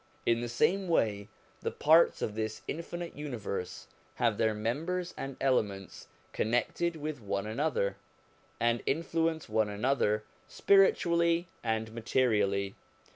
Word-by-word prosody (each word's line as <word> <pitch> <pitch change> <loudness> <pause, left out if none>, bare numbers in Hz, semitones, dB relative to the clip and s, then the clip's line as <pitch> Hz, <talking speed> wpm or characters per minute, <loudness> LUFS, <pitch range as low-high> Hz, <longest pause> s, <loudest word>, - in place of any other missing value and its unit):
In 115 0 +2
the 120 - -3
same 185 +11 +1
way, 105 -11 +1 0.3
the - - -1
parts 160 +3 +4
of 105 - -2
this 110 0 -4
infinite 170 +1 -5
universe 120 -10 -5 0.3
have 115 -4 +1
their 110 -1 +2
members 165 +12 -2
and 135 -1 -6
elements 105 -8 -1 0.3
connected 145 +9 0
with 155 -3 -5
one 100 -1 -2
another, 110 -2 -1 0.6
and 120 0 +2
influence 165 +1 0
one 110 -1 +1
another 105 -1 +1 0.2
spiritually 170 -3 +3
and 110 -1 -1
materially. 105 -5 +1
120 Hz, 120 wpm, -31 LUFS, 110-165 Hz, 0.6 s, parts